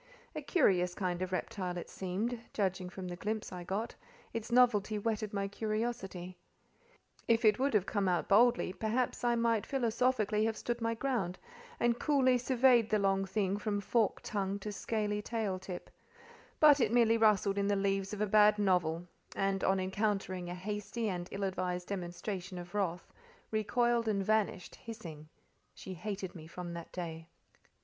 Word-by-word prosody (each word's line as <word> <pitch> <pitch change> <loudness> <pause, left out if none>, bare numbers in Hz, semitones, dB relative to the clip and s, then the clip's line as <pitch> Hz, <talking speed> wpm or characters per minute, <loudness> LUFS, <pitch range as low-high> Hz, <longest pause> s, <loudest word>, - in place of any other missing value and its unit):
A - - -3
curious 180 - +2
kind 180 -2 -2
of 185 0 -2
reptile 185 -1 -3
it 175 - -5
seemed, 205 +6 -3 0.2
judging 190 -3 -1
from 185 0 -7
the 175 - -5
glimpse 215 +4 -3
I 180 -1 -6
got; 200 +6 -3 0.4
its 230 0 -4
novelty 220 -4 +4
whetted 215 0 -2
my 200 -1 -1
curiosity: 210 -4 -3 0.9
if 230 0 +3
it 215 +2 +5
would 270 -3 +1
have 200 -3 +3
come 205 -2 0
out 175 -1 0
boldly, 230 -2 +4
perhaps 230 +6 -1
I 240 0 +3
might 230 -3 +2
philosophically 230 -4 +1
have 225 -1 -1
stood 240 0 -3
my 230 0 0
ground, 225 -8 -1 0.4
and 240 0 +2
coolly 260 -4 +3
surveyed 245 -2 +4
the 215 - +3
long 195 -1 +1
thing 195 0 0
from 205 -1 -1
forked 220 +2 +1
tongue 200 -1 -2
to 210 - -4
scaly 210 0 -2
tail 210 -4 -2
tip; 185 -1 -8 0.7
but 295 -2 +7
it 225 -4 +2
merely 230 -1 +4
rustled 205 -2 +3
in 200 - +1
the 205 - +2
leaves 195 0 0
of 210 -1 -4
a - - +3
bad 210 +1 +5
novel; 175 -4 +1 0.3
and, 195 -1 0
on 190 0 +3
encountering 190 -2 -1
a 175 - -4
hasty 210 +4 -3
and 180 -1 -4
ill 200 - -4
advised 180 -2 -2
demonstration 185 0 -4
of 175 +1 -8
wrath, 180 -4 -2 0.4
recoiled 235 +2 +1
and 200 -3 0
vanished, 215 -4 0
hissing. 165 -10 -9 0.5
She 190 - -8
hated 190 +1 -5
me 160 -3 -10
from 175 +1 -7
that 170 -1 -8
day. 165 -2 -6
205 Hz, 170 wpm, -33 LUFS, 185-225 Hz, 0.9 s, but